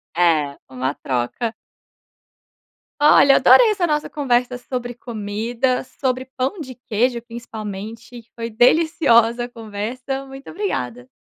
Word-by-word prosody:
É. 155 -5 +2
Uma 130 +1 -2
troca. 130 - -2 1.5
Olha 285 -2 +7
adorei 465 -3 +6
essa 370 -4 0
nossa 300 -1 -1
conversa 250 -3 0
sobre 245 -1 -5
comida. 230 +2 -2
Sobre 255 0 -3
pão 265 +9 -1
de 260 -4 -7
queijo 240 0 -1
principalmente. 225 -1 -8
E 235 - -11
foi 230 0 -4
deliciosa 240 -2 +3
a 245 - -10
conversa. 235 +5 -5
Muito 270 0 -11
obrigada! 125 - -4
240 Hz, 120 wpm, -21 LUFS, 215-265 Hz, 1.5 s, Olha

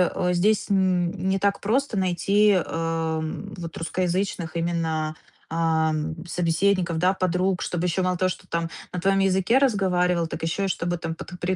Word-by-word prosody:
э, 180 0 +1
здесь, 200 +4 +2
м, 185 -3 +2 0.2
не 195 - +2
так 200 +1 +1
просто 240 +2 0
найти, 195 +3 +3
а, 165 -2 -1
м, 160 +6 -5
вот 170 -1 -7
русскоязычных 175 0 -2
именно, 160 -2 -1 0.3
а, 160 -1 +1
м, 155 +2 -3
собеседников, 175 +1 +1
да, 180 +3 +3
подруг. 185 0 0
Чтобы 175 0 -2
еще 180 +1 0
мало 185 -1 0
того, 185 +1 +2
что - - -7
там 170 0 -1 0.2
на 180 - -3
твоем 195 +2 +2
языке 195 +5 +3
разговаривал, 180 -8 +2
так - - -6
еще 165 +5 0
и - - 0
чтобы 175 -1 -1
там 165 -1 -4
под 180 +1 -9
пре 185 +1 0
180 Hz, 175 wpm, -24 LUFS, 165-190 Hz, 0.3 s, найти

